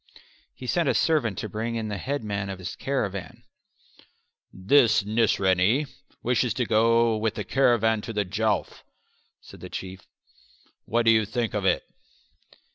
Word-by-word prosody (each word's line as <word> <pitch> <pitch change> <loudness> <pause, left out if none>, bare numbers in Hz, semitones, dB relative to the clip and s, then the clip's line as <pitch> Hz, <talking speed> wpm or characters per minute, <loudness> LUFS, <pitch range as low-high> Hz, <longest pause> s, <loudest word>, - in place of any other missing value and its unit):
He 130 - -10
sent 165 +3 +1
a - - +1
servant 125 - +1
to - - -4
bring 110 +3 -4
in 110 -1 -3
the 105 -2 -4
headman 105 -7 -3
of 95 - -5
his 95 - -6
caravan. 115 -3 -4 1.1
"This 110 +2 +3
Nisraney 105 +2 +2 0.4
wishes 125 -2 +1
to 125 - 0
go 115 +1 +3
with 110 0 -1
the 105 - -3
caravan 110 -1 +2
to 115 - -6
the 105 -1 0
Jowf," 105 +2 -1 0.6
said - - -14
the - - -9
Chief. 95 0 -7 0.8
"What 120 +1 0
do 115 - +6
you 110 -1 +4
think 115 +2 -3
of 105 -2 -2
it?" - - +2
110 Hz, 150 wpm, -25 LUFS, 100-120 Hz, 1.1 s, do